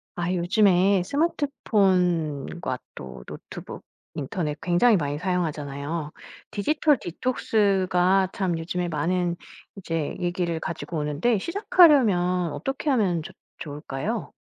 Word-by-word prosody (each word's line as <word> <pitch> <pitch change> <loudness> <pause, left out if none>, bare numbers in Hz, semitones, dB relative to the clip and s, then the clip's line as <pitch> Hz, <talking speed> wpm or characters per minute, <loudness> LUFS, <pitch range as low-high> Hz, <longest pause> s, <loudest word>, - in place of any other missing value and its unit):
아 175 +1 -1
요즘에 190 0 +3
스마트폰과 180 - 0 0.2
또 65 -2 -9
노트북, - - -9 0.3
인터넷 150 +1 -3
굉장히 180 +7 +4
많이 145 -2 -2
사용하잖아요. 155 -4 -3 0.4
디지털 295 +6 +2
디톡스가 190 -3 +1
참 185 -4 -1
요즘에 175 +2 -3
많은 170 +2 0 0.4
이제 165 -6 -3
얘기를 175 -2 -1
가지고 165 +1 -5
오는데 150 +10 +1
시작하려면 210 - +4
어떻게 270 - -3
하면 200 - +2
조 155 - -9 0.3
좋을까요? 145 -3 -4
180 Hz, 275 characters per minute, -25 LUFS, 160-200 Hz, 0.4 s, 굉장히